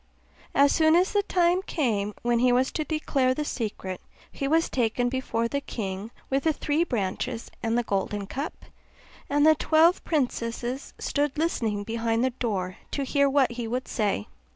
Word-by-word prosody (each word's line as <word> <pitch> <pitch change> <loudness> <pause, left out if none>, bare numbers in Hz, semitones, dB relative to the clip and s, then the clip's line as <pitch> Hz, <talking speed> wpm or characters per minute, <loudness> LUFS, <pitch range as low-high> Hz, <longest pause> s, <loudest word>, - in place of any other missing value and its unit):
As 280 +1 +5
soon 315 0 +4
as 360 +2 +3
the 410 - +4
time 360 -2 +2
came 215 - -1
when 240 -1 +2
he 250 +1 +4
was 255 +2 +2
to 310 - -1
declare 280 -4 0
the 300 - -2
secret, 205 -8 -4 0.3
he 275 - -3
was 325 +3 +3
taken 245 0 0
before 245 -3 -1
the 280 +4 -2
king 200 -4 -5 0.2
with 270 +1 0
the 320 - +4
three 300 +3 0
branches 230 - -3
and 225 0 0
the 240 - +2
golden 200 -1 -2
cup; 280 - -6 0.6
and 290 +1 +3
the 315 - +8
twelve 320 +3 +3
princesses 250 -3 -2
stood 290 0 -1
listening 225 -10 0
behind 230 +1 0
the 260 - +2
door 195 -7 -3
to 280 - -2
hear 280 +1 +2
what 270 -3 +3
he 235 -1 -4
would 250 +3 -3
say. 205 - -1
255 Hz, 175 wpm, -26 LUFS, 225-295 Hz, 0.6 s, the